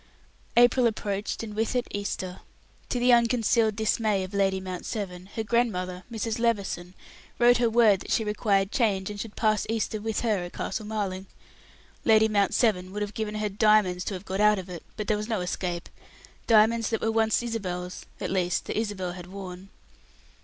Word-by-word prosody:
April 245 Hz, +1 st, +6 dB
approached 205 Hz, -1 st, -3 dB
and 215 Hz, -2 st, -6 dB
with 220 Hz, +3 st, -1 dB
it 245 Hz, -, +1 dB
Easter. 190 Hz, -2 st, -4 dB, 0.5 s
To -, -, -1 dB
the 245 Hz, 0 st, +4 dB
unconcealed 230 Hz, -2 st, +3 dB
dismay 215 Hz, -2 st, +1 dB
of 185 Hz, +2 st, -8 dB
Lady 195 Hz, -1 st, +2 dB
Mount 185 Hz, -1 st, -6 dB
Severn, 185 Hz, -4 st, -5 dB
her 225 Hz, -, -1 dB
grandmother, 185 Hz, -6 st, -1 dB
Mrs. 225 Hz, 0 st, -2 dB
Levison, 195 Hz, -6 st, -1 dB, 0.4 s
wrote 240 Hz, 0 st, +5 dB
her 235 Hz, -1 st, +2 dB
word 220 Hz, -4 st, +5 dB
that -, -, -10 dB
she 225 Hz, -, +2 dB
required 205 Hz, -2 st, +1 dB
change, 200 Hz, -5 st, +1 dB
and 205 Hz, -, -7 dB
should 215 Hz, 0 st, -6 dB
pass 215 Hz, -1 st, +1 dB
Easter 220 Hz, -1 st, -1 dB
with 220 Hz, 0 st, -2 dB
her 220 Hz, -4 st, +1 dB
at 175 Hz, 0 st, -6 dB
Castle 215 Hz, -, -4 dB
Marling. 195 Hz, -3 st, -3 dB, 0.8 s
Lady 220 Hz, -1 st, +5 dB
Mount 205 Hz, -2 st, +1 dB
Severn 185 Hz, -6 st, +2 dB
would 210 Hz, +1 st, -2 dB
have 205 Hz, 0 st, -5 dB
given 215 Hz, -1 st, -3 dB
her 215 Hz, 0 st, -1 dB
diamonds 205 Hz, -3 st, +3 dB
to 200 Hz, -, -3 dB
have 185 Hz, +2 st, -8 dB
got 190 Hz, +1 st, -2 dB
out 210 Hz, 0 st, +5 dB
of 190 Hz, -1 st, -6 dB
it, 175 Hz, -, -7 dB, 0.2 s
but 215 Hz, -, -3 dB
there 215 Hz, -, +2 dB
was 210 Hz, +2 st, -5 dB
no 220 Hz, -3 st, 0 dB
escape 180 Hz, -1 st, -3 dB, 0.6 s
diamonds 225 Hz, 0 st, +4 dB
that 225 Hz, -, -1 dB
were 225 Hz, -, +1 dB
once 220 Hz, +1 st, +2 dB
Isabel's 180 Hz, -6 st, -4 dB, 0.2 s
at -, -, -3 dB
least, 180 Hz, -2 st, 0 dB
that -, -, -2 dB
Isabel 200 Hz, -5 st, -3 dB
had 175 Hz, 0 st, -9 dB
worn. 190 Hz, 0 st, -8 dB
210 Hz, 190 wpm, -27 LUFS, 190-225 Hz, 0.8 s, April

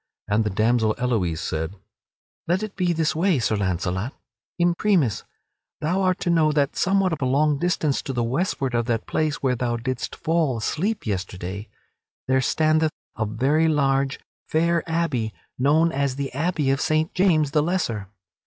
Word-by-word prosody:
And 105 Hz, +2 st, +2 dB
the 105 Hz, -, -1 dB
damsel 110 Hz, +2 st, +2 dB
Elouise 100 Hz, -10 st, 0 dB
said: 80 Hz, +4 st, -3 dB, 0.7 s
"Let 180 Hz, +5 st, +1 dB
it 215 Hz, -2 st, -6 dB
be 180 Hz, -2 st, +1 dB
this 160 Hz, -2 st, 0 dB
way, 175 Hz, 0 st, +2 dB
Sir 110 Hz, -2 st, +1 dB
Launcelot. 95 Hz, -, -1 dB, 0.5 s
Imprimis 175 Hz, -, +2 dB, 0.5 s
thou 170 Hz, +5 st, 0 dB
art 185 Hz, -1 st, +1 dB
to 175 Hz, -, +1 dB
know 160 Hz, -2 st, +4 dB
that 145 Hz, -2 st, +1 dB
somewhat 190 Hz, -1 st, +2 dB
of 155 Hz, -, -4 dB
a -, -, +1 dB
long 145 Hz, +2 st, +2 dB
distance 165 Hz, -5 st, 0 dB
to -, -, -5 dB
the 120 Hz, -2 st, -1 dB
westward 135 Hz, +1 st, -1 dB
of 120 Hz, 0 st, 0 dB
that 115 Hz, -2 st, -1 dB
place 155 Hz, -2 st, -1 dB
where 130 Hz, -2 st, +2 dB
thou 120 Hz, -1 st, -1 dB
didst 125 Hz, +1 st, -4 dB
fall 160 Hz, -6 st, 0 dB
asleep 195 Hz, -, -2 dB
yesterday, 95 Hz, 0 st, -4 dB, 0.6 s
there 130 Hz, 0 st, +3 dB
standeth 155 Hz, +4 st, +2 dB, 0.3 s
a 110 Hz, -2 st, -1 dB
very 135 Hz, +9 st, +2 dB
large, 135 Hz, -3 st, +1 dB, 0.3 s
fair 170 Hz, +1 st, +2 dB
abbey 150 Hz, -10 st, -1 dB, 0.2 s
known 155 Hz, +5 st, +3 dB
as 140 Hz, -3 st, -1 dB
the 140 Hz, -1 st, -4 dB
Abbey 150 Hz, -1 st, 0 dB
of 135 Hz, -, 0 dB
Saint 155 Hz, +1 st, +1 dB
James 160 Hz, -6 st, +3 dB
the 150 Hz, -, +3 dB
Lesser. 145 Hz, -, -1 dB
140 Hz, 165 wpm, -24 LUFS, 115-165 Hz, 0.7 s, know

